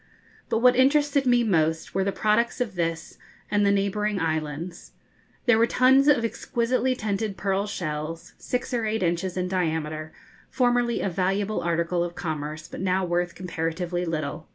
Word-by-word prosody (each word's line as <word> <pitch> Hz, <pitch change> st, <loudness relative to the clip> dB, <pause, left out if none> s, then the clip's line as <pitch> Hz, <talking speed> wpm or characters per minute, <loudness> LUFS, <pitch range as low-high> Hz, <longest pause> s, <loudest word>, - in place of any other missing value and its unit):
But 225 Hz, -, 0 dB
what 250 Hz, 0 st, +6 dB
interested 280 Hz, +1 st, +3 dB
me 245 Hz, -1 st, +4 dB
most 160 Hz, -6 st, +1 dB
were 190 Hz, -, +1 dB
the 200 Hz, -, 0 dB
products 215 Hz, +4 st, +1 dB
of 240 Hz, -4 st, -1 dB
this 165 Hz, -2 st, -3 dB, 0.3 s
and 205 Hz, 0 st, +3 dB
the 200 Hz, -, +4 dB
neighbouring 200 Hz, +1 st, 0 dB
islands. 160 Hz, +1 st, -3 dB, 0.5 s
There 240 Hz, -3 st, +5 dB
were 230 Hz, -, +4 dB
tons 265 Hz, +3 st, +4 dB
of 255 Hz, -6 st, +4 dB
exquisitely 255 Hz, +2 st, 0 dB
tinted 210 Hz, -2 st, -2 dB
pearl 195 Hz, +1 st, 0 dB
shells, 160 Hz, -3 st, -5 dB
six 250 Hz, 0 st, -3 dB
or 230 Hz, -2 st, 0 dB
eight 215 Hz, -2 st, -1 dB
inches 175 Hz, +2 st, -1 dB
in 180 Hz, 0 st, 0 dB
diameter, 160 Hz, -4 st, -2 dB, 0.4 s
formerly 245 Hz, -1 st, +1 dB
a 195 Hz, -, 0 dB
valuable 195 Hz, +4 st, 0 dB
article 170 Hz, +1 st, 0 dB
of 175 Hz, 0 st, -5 dB
commerce, 155 Hz, -1 st, -4 dB
but -, -, -8 dB
now 190 Hz, 0 st, +1 dB
worth 175 Hz, 0 st, -1 dB
comparatively 175 Hz, 0 st, -3 dB
little. 155 Hz, -1 st, -3 dB
190 Hz, 160 wpm, -25 LUFS, 165-230 Hz, 0.5 s, what